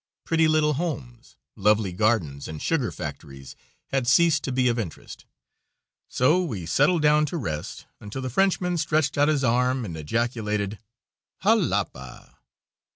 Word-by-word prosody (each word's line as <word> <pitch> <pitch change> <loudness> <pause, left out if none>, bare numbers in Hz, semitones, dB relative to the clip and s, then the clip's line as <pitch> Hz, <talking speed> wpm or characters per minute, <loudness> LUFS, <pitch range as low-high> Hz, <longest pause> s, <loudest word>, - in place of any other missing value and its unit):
Pretty 165 -1 +3
little 155 -1 +2
homes, 135 -7 -5 0.2
lovely 105 -2 +2
gardens 90 -9 0
and 80 -1 -7
sugar 140 - 0
factories 70 -4 -8 0.3
had 135 -3 -1
ceased 155 +2 +4
to 135 - -3
be 125 0 +2
of 120 -1 +1
interest, 90 -9 -7 0.8
so 155 +9 +2
we 105 - -5
settled 150 - +2
down 150 0 +4
to 175 - -4
rest 80 - -5
until 105 +6 -7
the - - -2
Frenchman 180 +1 +1
stretched 155 -2 0
out 145 0 +3
his 150 -3 +1
arm 125 +1 +1
and 85 -5 -6
ejaculated 105 +3 -2 0.6
"Jalapa!" 105 - -1
125 Hz, 140 wpm, -25 LUFS, 100-155 Hz, 0.8 s, ceased